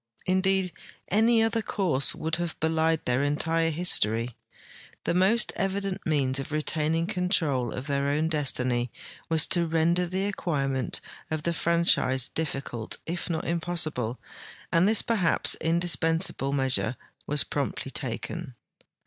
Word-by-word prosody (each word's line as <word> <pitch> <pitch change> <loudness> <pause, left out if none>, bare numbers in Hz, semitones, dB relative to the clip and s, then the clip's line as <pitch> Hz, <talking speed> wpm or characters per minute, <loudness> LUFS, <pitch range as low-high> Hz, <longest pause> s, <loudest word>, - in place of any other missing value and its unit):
Indeed, 190 0 +1 0.4
any 225 +3 +4
other 225 0 +1
course 175 -10 0
would 160 +1 -2
have 175 -1 -4
belied 160 0 +1
their 125 +2 +1
entire 165 +3 +1
history. 120 - +1 0.7
The - - 0
most 195 +6 +3
evident 195 -1 -2
means 140 -4 +1
of 135 - -6
retaining 155 +2 0
control 175 - 0
of 125 - -5
their 140 -1 0
own 150 +3 +1
destiny 125 -6 0 0.4
was 160 -2 +4
to 170 -2 +1
render 165 +2 +2
the 190 +3 -1
acquirement 140 -9 -1 0.3
of 155 -1 -3
the 170 - 0
franchise 165 -7 +1
difficult 135 -7 -3
if 175 +2 -4
not 165 -2 -2
impossible, 160 -9 -2 0.5
and 170 +3 +4
this 220 - +4
perhaps 205 -8 +3
indispensable 165 -3 +1
measure 130 -3 +2 0.3
was 150 0 +3
promptly 140 -1 -3
taken. 130 +3 -4
160 Hz, 130 wpm, -27 LUFS, 140-175 Hz, 0.7 s, any